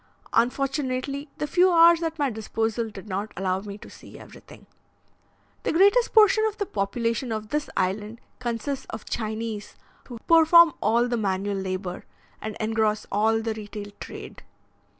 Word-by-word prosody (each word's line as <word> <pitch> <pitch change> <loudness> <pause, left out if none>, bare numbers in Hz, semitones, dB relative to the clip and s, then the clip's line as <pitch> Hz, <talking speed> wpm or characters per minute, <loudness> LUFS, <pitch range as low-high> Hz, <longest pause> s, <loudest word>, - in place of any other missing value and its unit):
Unfortunately, 275 +3 -1
the - - -2
few 360 +5 +3
hours 335 0 +6
at 325 -1 -3
my 285 -4 0
disposal 225 +1 -2
did 200 -1 -11
not 200 +2 -3
allow 185 0 0
me 200 0 -8
to - - -13
see - - -13
everything. - - -14 1.0
The - - -1
greatest 405 +8 +4
portion 435 -1 +5
of 435 -1 -2
the 405 - -1
population 230 - -2
of 215 -1 -4
this 300 0 -2
island 210 +4 -2 0.2
consists 250 +3 -3
of 220 - -7
Chinese, 220 -1 -4 0.3
who 245 - -8
perform 330 0 +7
all 235 +3 +2
the 240 -1 -1
manual 200 -1 -1
labour, 185 -1 -4 0.4
and 215 -1 -5
engross 220 -1 0
all 220 +2 +2
the 225 -1 -1
retail 210 -1 -8
trade. - - -9
225 Hz, 150 wpm, -25 LUFS, 210-290 Hz, 1.0 s, perform